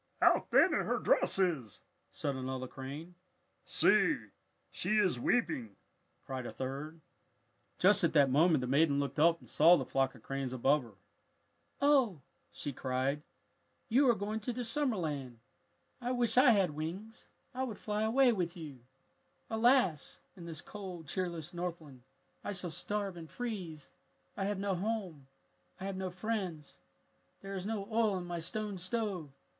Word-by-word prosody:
"How - - +4
thin - - +5
her - - +1
dress - - +2
is!" 160 - 0 0.3
said 140 -2 -3
another 130 0 -4
crane. 140 +7 -8 0.5
"See, - - +4 0.5
she 215 - 0
is 185 - +2
weeping!" 130 - 0 0.5
cried 130 -2 -4
a - - -6
third. 140 +5 -5 0.8
Just 200 +1 +5
at 170 - +3
that 140 -4 +5
moment 155 +1 +4
the 125 - -2
maiden 140 +2 +3
looked 140 0 -2
up 165 +2 +5
and - - -17
saw 170 +4 +6
the - - -3
flock 135 0 0
of 115 - -16
cranes 135 -2 -3
above 135 +4 +3
her. 115 -5 -14 0.9
"Oh," 260 - +4 0.3
she 145 - -5
cried, 130 +3 -1 0.7
"you 260 +3 +5
are 235 - +5
going 210 +2 -3
to 220 +3 -3
the 245 +1 -4
summer 255 +1 +1
land. 145 - -4 0.6
I 245 +1 -1
wish 245 -2 +2
I 255 +1 +7
had 195 -7 +4
wings. 175 +9 -6 0.3
I 255 - -3
would 230 -6 -4
fly 210 +1 -2
away 240 +3 +4
with 180 -3 -2
you! 150 -6 -8 0.7
"Alas! 220 - +2 0.2
in 170 -2 -10
this 160 -1 -6
cold, 185 -5 -8
cheerless 175 -1 -3
Northland 170 -7 -6 0.4
I 205 - -3
shall 180 -3 -4
starve 200 +1 -3
and 160 -2 -9
freeze. 180 - -6 0.4
I 195 - -2
have 205 0 -1
no 200 0 -1
home. 185 -7 -3 0.5
I - - -8
have 195 -1 -3
no 190 0 -3
friends. 180 -5 -4 0.6
"There 195 0 -7
is 190 0 -4
no 210 -3 -3
oil 220 -3 +2
in 180 - -5
my 175 -1 -4
stone 205 +3 -3
stove! 185 -4 -2
175 Hz, 160 wpm, -33 LUFS, 145-210 Hz, 0.9 s, I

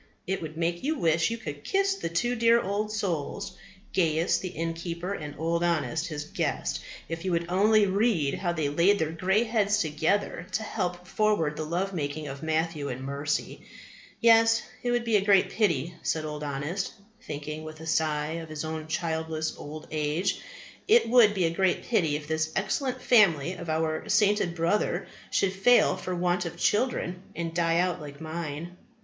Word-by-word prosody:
It 190 +2 -2
would 155 -1 -7
make 170 +1 -1
you 310 +3 0
wish 165 -1 +2
you 230 - -3
could 145 -9 -7
kiss 390 0 +2
the 390 - -4
two 240 +9 0
dear 230 0 +4
old 210 +1 -2
souls, 200 -2 -3 0.4
Gaius 165 -1 +2
the 185 - -4
innkeeper 170 +2 -4
and 150 -6 -6
Old 170 +2 0
Honest 170 0 0
his 150 -4 -4
guest, - - -2 0.3
if 165 0 -5
you 190 - -1
would 170 0 +1
only 210 +3 +4
read 195 -7 +1
how 175 -2 -1
they 160 -4 -1
laid 170 +8 +3
their 160 -4 -1
grey 190 +6 +2
heads 215 -3 +1
together 165 +2 0
to 220 - 0
help 180 -5 -3
forward 180 -7 +1
the 155 - -3
love 180 +5 -2
making 150 -2 -3
of 140 0 -7
Matthew 160 -2 -1
and 130 +1 -5
Mercy. 140 +2 -2 0.6
Yes, 225 -1 +5 0.2
it 245 - -2
would 240 0 +1
be 225 -2 +4
a 195 - 0
great 200 -2 +4
pity, 170 - +1
said 155 -1 -1
Old 150 0 -5
Honest, 145 +7 -3 0.3
thinking 150 +2 -6
with 155 0 -9
a 160 - -9
sigh 155 -1 0
of 160 - -10
his 155 0 -4
own 155 0 -5
childless 160 -1 -2
old 155 +1 -8
age, 155 +4 -1 0.5
it 455 +3 +5
would 225 -3 +6
be 185 -3 +2
a 165 - +1
great 185 +1 +1
pity 170 -11 +1
if 150 0 -5
this 160 0 -1
excellent 255 +6 -1
family 180 - +4
of 170 -2 -7
our 155 +4 -1
sainted 205 -4 +3
brother 170 +5 0 0.2
should 195 -1 +1
fail 195 +4 +4
for 185 0 -4
want 180 0 +1
of 170 - -6
children, 205 -6 0
and 165 -1 -3
die 165 -1 +2
out 180 -1 +1
like 145 -1 -9
mine. 160 +1 -5
170 Hz, 180 wpm, -27 LUFS, 155-200 Hz, 0.6 s, would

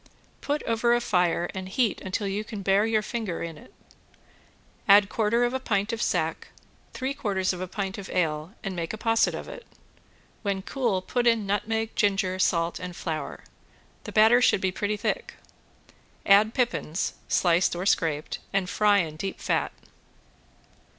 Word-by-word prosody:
Put 295 +1 -1
over 235 +1 +2
a - - +2
fire 180 -5 +1
and 185 -1 -6
heat 220 +1 0
until 190 +2 -3
you 200 +2 -2
can 210 -2 -7
bear 195 +3 +3
your 220 -1 +1
finger 220 -9 -3
in 165 -1 -5
it. 150 - -15 1.2
Add 200 0 +7
quarter 230 +2 +1
of 245 +1 +1
a 260 - -1
pint 205 -3 -1
of 230 - -3
sack, - - -1 0.4
three 265 +1 -3
quarters 195 -8 -1
of 180 - -6
a 185 - -3
pint 195 +2 -4
of 195 - -8
ale 160 +2 -1
and 195 -2 -4
make 170 +1 -3
a - - -5
posset 225 +1 +2
of - - -7
it. - - -9 0.8
When 200 -3 -2
cool 230 -9 -1
put 245 +3 0
in 230 -3 +3
nutmeg, 220 +3 -1
ginger, 195 -2 +1
salt 170 -2 +1
and 180 -1 -6
flour. 155 -4 -5 0.6
The - - -6
batter 225 +3 +6
should 225 - +4
be 190 -1 0
pretty 205 +2 -2
thick. - - -3 0.9
Add 210 +3 +5
pippins, 235 -9 -1
sliced 175 0 +2
or 180 +2 -3
scraped 155 -6 0
and 195 -2 0
fry 205 +1 +3
in 155 -2 -6
deep 195 +4 -4
fat. - - 0
200 Hz, 170 wpm, -26 LUFS, 185-225 Hz, 1.2 s, Add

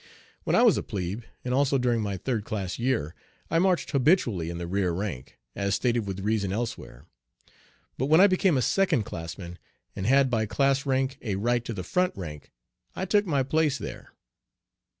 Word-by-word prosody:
When - - +2
I - - +5
was - - +5
a - - 0
plebe, 100 +4 -4 0.2
and 125 - -1
also 140 +1 +3
during 120 -3 +1
my 100 -2 -2
third 115 +1 -2
class 100 -3 -4
year, 120 - 0 0.4
I 165 - +3
marched 185 -1 +1
habitually 125 - +2
in 85 - -5
the 85 - -4
rear 95 0 0
rank, 85 -8 -5 0.2
as 100 0 0
stated 120 0 0
with 95 0 -4
reason 105 -2 0
elsewhere. 100 - -5 0.9
But 130 - 0
when 160 +3 +5
I 195 - +9
became 185 -5 +3
a 125 - +1
second 180 - +2
classman, 85 0 -7 0.4
and 95 0 -3
had 135 0 +4
by 110 -2 +1
class 135 +7 +1
rank 135 +1 0
a 105 -5 -2
right 120 +4 0
to 115 - -4
the 90 - -4
front 180 - 0
rank, 75 -6 -8 0.4
I 190 - -2
took 205 +1 +2
my 140 -5 +1
place 150 +1 +1
there. - - -8
120 Hz, 190 wpm, -27 LUFS, 95-140 Hz, 0.9 s, I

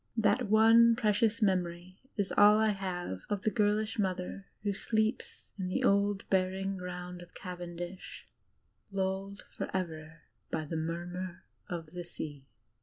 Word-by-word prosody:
That 215 +1 +2
one 225 +2 +7
precious 220 0 +2
memory 180 -1 -1 0.2
is 200 -2 0
all 205 +1 +8
I 220 0 +4
have 180 - -3
of 205 -2 -1
the 215 - +2
girlish 215 0 +1
mother 190 0 -2 0.2
who 205 -1 +1
sleeps 225 - -1
in 185 - -1
the 185 - -1
old 200 0 +2
burying 190 +1 +1
ground 180 -1 -6
of 175 - -14
Cavendish, 175 0 -7 0.6
lulled 195 +1 -2
forever 160 -3 -4 0.3
by 155 - -2
the 165 - -4
murmur 175 +3 -4 0.3
of 165 -3 -5
the 180 -1 -5
sea. 145 -5 -7
190 Hz, 135 wpm, -32 LUFS, 175-210 Hz, 0.6 s, all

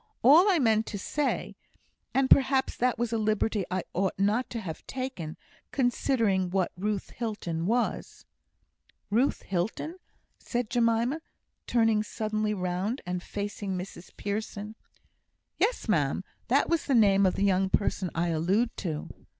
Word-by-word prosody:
All 320 - +7
I 370 - +4
meant 225 -5 +2
to 205 - -4
say 290 +9 -2 0.6
and 270 0 +2
perhaps 265 0 +4
that 250 0 +1
was 235 0 -1
a 225 - +1
liberty 215 -2 +1
I 185 -1 -1
ought 190 +1 0
not 210 +6 +1
to 235 - -4
have 170 -7 -6
taken, 255 -12 -5 0.3
considering 230 -7 +1
what 185 -1 0
Ruth 200 +2 -2
Hilton 185 -8 -3
was 240 +3 -1 0.4
" - - -39
"Ruth 245 +7 +2
Hilton!" 205 - -2 0.4
said 240 -2 -3
Jemima, 235 +5 +2 0.5
turning 225 -3 +3
suddenly 215 0 -2
round, 185 +6 -2
and 180 0 -3
facing 200 -1 -4
Mrs 180 0 -8
Pearson. 210 0 -4 0.9
"Yes, - - +1
ma'am, - - +1 0.2
that - - +3
was 335 -1 +1
the 275 - +3
name 200 -3 +5
of 185 - 0
the 200 - +1
young 190 -1 +2
person 190 -2 0
I 170 +1 +1
allude 185 +9 +1
to." 160 -6 -3
215 Hz, 145 wpm, -28 LUFS, 190-240 Hz, 0.9 s, All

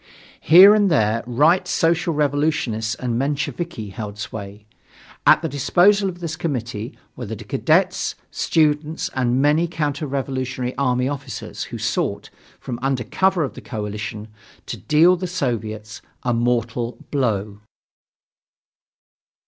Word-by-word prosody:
Here 185 +6 +8
and 205 -2 +3
there 115 -7 +2
Right 150 +9 +3
Social 165 +1 +1
Revolutionists 145 -7 0
and 120 -2 -2
Mensheviki 140 -3 -3
held 105 0 -7
sway. 100 0 -7 0.6
At - - +6
the - - 0
disposal 185 +9 +3
of 175 -1 -9
this 165 -2 -3
committee 120 -9 -4 0.2
were - - -6
the - - -4
cadets, - - 0 0.2
students, 155 0 0
and 125 -1 +1
many 155 +4 +3
counter 150 -2 -2
revolutionary 130 -2 -3
army 125 -2 +1
officers, 135 -2 -5
who - - -7
sought, - - -2 0.3
from 120 -2 -6
under 135 -2 0
cover 185 - +1
of 140 - -4
the - - -10
coalitions, 105 -1 -5 0.4
to - - -5
deal 165 +4 +4
the 185 +1 -4
Soviets 110 - -4 0.2
a 120 - +1
mortal 120 0 -1
blow. 105 -7 -1
130 Hz, 125 wpm, -21 LUFS, 115-160 Hz, 0.6 s, Here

